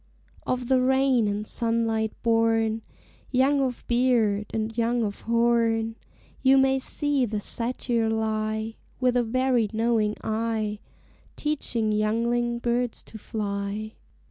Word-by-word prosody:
Of 250 -1 -1
the 260 0 +3
rain 265 -3 +3
and 205 +1 -2
sunlight 225 -1 0
born, 225 -1 +2 0.5
Young 270 +2 +3
of 255 -3 -2
beard 235 -4 +2
and 220 0 -2
young 235 0 +1
of 205 -2 -4
horn, 230 -1 +1 0.5
You 265 0 +5
may 265 0 +3
see 290 0 0
the 215 -3 -1
satyr 235 +1 -1
lie, 220 0 -2 0.2
With 250 -1 +2
a 245 - +4
very 245 -1 +1
knowing 220 -1 +1
eye, 220 -1 -1 0.6
Teaching 245 -7 -1
youngling 235 +3 +1
birds 240 0 -1
to 220 - -11
fly. 205 0 -4
230 Hz, 120 wpm, -26 LUFS, 220-245 Hz, 0.6 s, You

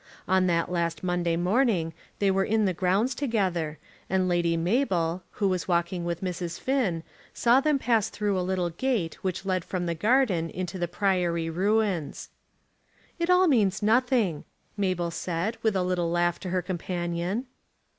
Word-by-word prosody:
On 185 0 +3
that 170 0 +1
last 170 -2 -1
Monday 175 -2 0
morning 180 -3 +1 0.2
they 200 -1 +2
were 195 0 +2
in 215 +1 +1
the 185 - +1
grounds 190 +8 +1
together, 185 - -1 0.3
and 185 0 +1
Lady 170 -2 +1
Mabel, 180 -3 +1
who 200 - 0
was 185 -2 -1
walking 175 0 0
with 170 -1 -3
Mrs. 175 -2 -4
Finn, 225 -12 0 0.3
saw 240 +2 +4
them 300 +1 +2
pass 230 -5 +1
through 205 -2 -1
a 185 - 0
little 180 -1 -1
gate 205 -3 -2
which 190 0 -2
led 185 -2 0
from 180 0 -3
the 170 - -1
gardens 195 - +2
into 185 +1 -4
the 175 - 0
Priory 175 -3 0
ruins. 195 -2 0 0.9
"It 340 +1 0
all 365 +1 +5
means 210 - +2
nothing," 225 - +2 0.3
Mabel 185 -4 -1
said 175 +6 -2
with 220 -3 +1
a 185 - +1
little 180 -2 0
laugh 175 0 +1
to 185 - -5
her 180 0 0
companion. 175 +4 -3
185 Hz, 165 wpm, -27 LUFS, 170-210 Hz, 0.9 s, all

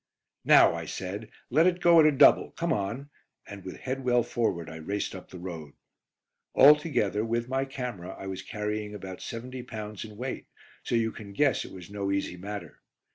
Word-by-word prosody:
"Now," - - +7
I - - -4
said, 100 +4 -5 0.2
"let 160 +7 +5
it 180 -1 +1
go 170 -1 +6
at 155 - +7
a - - +5
double. 140 - +6
Come 170 0 0
on," 115 +9 -3 0.3
and 100 -2 -10
with 95 - -7
head 130 +1 -4
well 125 -1 +3
forward 110 -8 -1
I 80 -1 -8
raced 100 +6 -3
up 95 -2 -10
the 90 - -9
road. 85 -5 -7 0.8
Altogether, 145 -8 +5
with 115 +1 -1
my 135 +1 0
camera, 120 -9 -6
I - - -8
was 95 -1 -5
carrying 105 0 -4
about 95 -2 -8
seventy 125 +2 -6
pounds 110 -4 -7
in 105 -2 -11
weight, 125 +2 -5 0.3
so - - -2
you 115 -1 +1
can 100 -2 -10
guess 135 +1 +2
it - - -10
was 90 0 -11
no 100 -1 -2
easy 100 -2 -1
matter. 100 +3 -8
110 Hz, 190 wpm, -28 LUFS, 95-130 Hz, 0.8 s, Now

